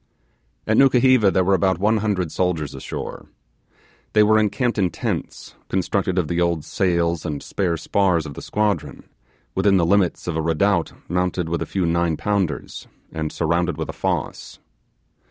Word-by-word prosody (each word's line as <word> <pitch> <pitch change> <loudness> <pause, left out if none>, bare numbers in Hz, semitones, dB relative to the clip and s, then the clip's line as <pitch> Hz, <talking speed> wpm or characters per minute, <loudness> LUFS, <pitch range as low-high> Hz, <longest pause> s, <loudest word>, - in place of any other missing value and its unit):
At - - +1
Nukuheva, 130 -4 +5
there 95 - +2
were 95 +2 +2
about 95 -1 +2
one 110 +4 +2
hundred 100 -6 -1
soldiers 80 -5 -1
ashore. - - -7 0.9
They 105 - +6
were 110 +1 +4
encamped 115 +2 0
in 95 -2 +2
tents, - - -5 0.2
constructed 95 +1 -1
of 90 -4 +1
the 85 +1 -1
old 85 -3 0
sails 85 -2 0
and 75 -2 -4
spare 90 -4 -1
spars 90 -1 +1
of 70 - -7
the - - -8
squadron, 105 -1 -2 0.5
within 95 0 +3
the 85 - +2
limits 95 0 +1
of 85 - -3
a 80 - 0
redoubt 85 +3 +1 0.2
mounted 90 -1 -1
with 85 0 -2
a - - -3
few 95 -3 -1
nine 85 -1 +1
pounders, 100 -6 -2 0.2
and 80 -1 -3
surrounded 85 +2 0
with - - -4
a - - -4
fosse. - - -3
90 Hz, 165 wpm, -22 LUFS, 85-100 Hz, 0.9 s, They